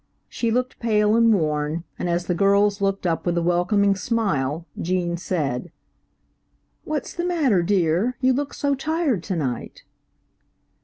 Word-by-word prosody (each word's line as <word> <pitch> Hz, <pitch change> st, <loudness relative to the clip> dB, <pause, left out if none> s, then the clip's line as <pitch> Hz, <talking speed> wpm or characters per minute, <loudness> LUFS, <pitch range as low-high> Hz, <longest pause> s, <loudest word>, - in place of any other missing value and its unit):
She 230 Hz, -, -2 dB
looked 250 Hz, +2 st, -1 dB
pale 210 Hz, -2 st, +2 dB
and 230 Hz, 0 st, +5 dB
worn, 155 Hz, -3 st, 0 dB, 0.2 s
and 175 Hz, -, -2 dB
as 175 Hz, +1 st, 0 dB
the 180 Hz, -, 0 dB
girls 200 Hz, +2 st, +3 dB
looked 195 Hz, -1 st, 0 dB
up 165 Hz, -2 st, 0 dB
with 175 Hz, -1 st, 0 dB
a -, -, +2 dB
welcoming 190 Hz, +4 st, +2 dB
smile, 170 Hz, -, -1 dB, 0.2 s
Gene 175 Hz, -1 st, -1 dB
said, 165 Hz, -4 st, -3 dB, 1.1 s
"What's 300 Hz, -4 st, -3 dB
the 345 Hz, -, -3 dB
matter, 300 Hz, -, +2 dB
dear, 185 Hz, +5 st, +1 dB
you 260 Hz, 0 st, +3 dB
look 285 Hz, +2 st, -3 dB
so 285 Hz, -1 st, 0 dB
tired 300 Hz, -, 0 dB
to 190 Hz, -, -2 dB
night." 130 Hz, -7 st, -4 dB
195 Hz, 150 wpm, -23 LUFS, 170-235 Hz, 1.1 s, and